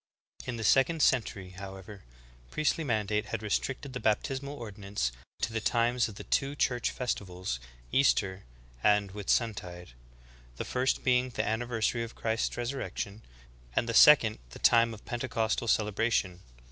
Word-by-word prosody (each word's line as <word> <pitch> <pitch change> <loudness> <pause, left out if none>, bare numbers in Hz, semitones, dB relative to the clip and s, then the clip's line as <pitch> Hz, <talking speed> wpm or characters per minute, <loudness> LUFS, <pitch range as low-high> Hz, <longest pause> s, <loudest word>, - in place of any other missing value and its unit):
I - - -16
11. - - -6
In 120 - -3
the 115 - -4
second 140 +8 +3
century, 105 -7 +1
however, 95 +1 -9 0.5
priestly 155 +1 0
mandate 105 -4 0
had 110 -1 -4
restricted 130 +6 -2
the 125 - -3
baptismal 135 +6 -1
ordinance 100 - -3 0.3
to 110 - -1
the 115 - -1
times 120 +2 +2
of 105 - -10
the - - -8
two 140 +1 0
Church 125 -4 +1
festivals, 95 - -3 0.3
Easter 100 -8 +2 0.4
and 105 +1 +3
Whitsuntide, 95 -3 -2 0.7
the - - -5
first 130 +1 0
be 125 -2 +4
ing 130 +1 -3
the 120 - -2
anniversary 115 +1 0
of 115 0 -6
Christ's 110 0 -1
resurrection, 115 -4 -4 0.5
and 115 - +1
the 115 - -1
sec 150 +2 +8
ond 110 -1 -3
the 60 - -11
time 115 -1 +4
of 105 - -16
Pentecostal 115 -2 -1
celebration. 105 -4 +1
115 Hz, 155 wpm, -30 LUFS, 100-125 Hz, 0.7 s, sec